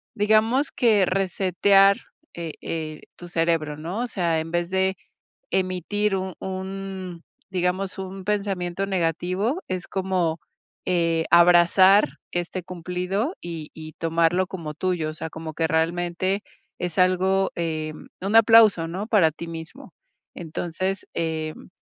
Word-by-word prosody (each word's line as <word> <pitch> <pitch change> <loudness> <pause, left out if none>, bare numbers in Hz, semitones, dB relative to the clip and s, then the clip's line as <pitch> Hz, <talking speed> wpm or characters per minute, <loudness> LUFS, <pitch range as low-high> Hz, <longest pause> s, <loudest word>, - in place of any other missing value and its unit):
digamos 220 +6 +2
que 215 -6 +3
resetear, 195 +1 +3 0.4
eh, 165 -2 -5
eh, 155 -2 -5 0.2
tu 175 - -10
cerebro, 165 -3 0
¿no? 170 +8 -5
O 245 - -1
sea, 170 -7 0
en 165 - -7
vez 175 0 -1
de 190 0 +1 0.5
emitir 190 +2 0
un 190 -1 -4
un, 190 -2 -6 0.3
digamos, 185 +1 -1
un 190 0 -6
pensamiento 195 -2 -1
negativo, 185 - -1
es 185 -1 -4
como, 185 -4 -1 0.5
eh, 165 -2 +1
abrazar 175 +3 +6 0.2
este 175 +1 -3
cumplido 180 - -3
y 165 -3 -7
y 155 -1 -9
tomarlo 165 +2 +1
como 165 -5 -6
tuyo, 175 -2 -1
o - - -12
sea, 160 - -5
como 160 -1 -7
que 165 - +1
realmente 175 +4 0 0.4
es 180 0 -4
algo, 190 +1 +3
eh, 155 -2 -2 0.3
un 200 +4 -1
aplauso, 225 -6 +7
¿no? 190 +5 -4
Para 190 -9 +4
ti 170 +2 -8
mismo. 165 0 -9 0.4
Entonces, 175 +3 -3
em, 160 -1 -3
180 Hz, 130 wpm, -24 LUFS, 165-195 Hz, 0.5 s, aplauso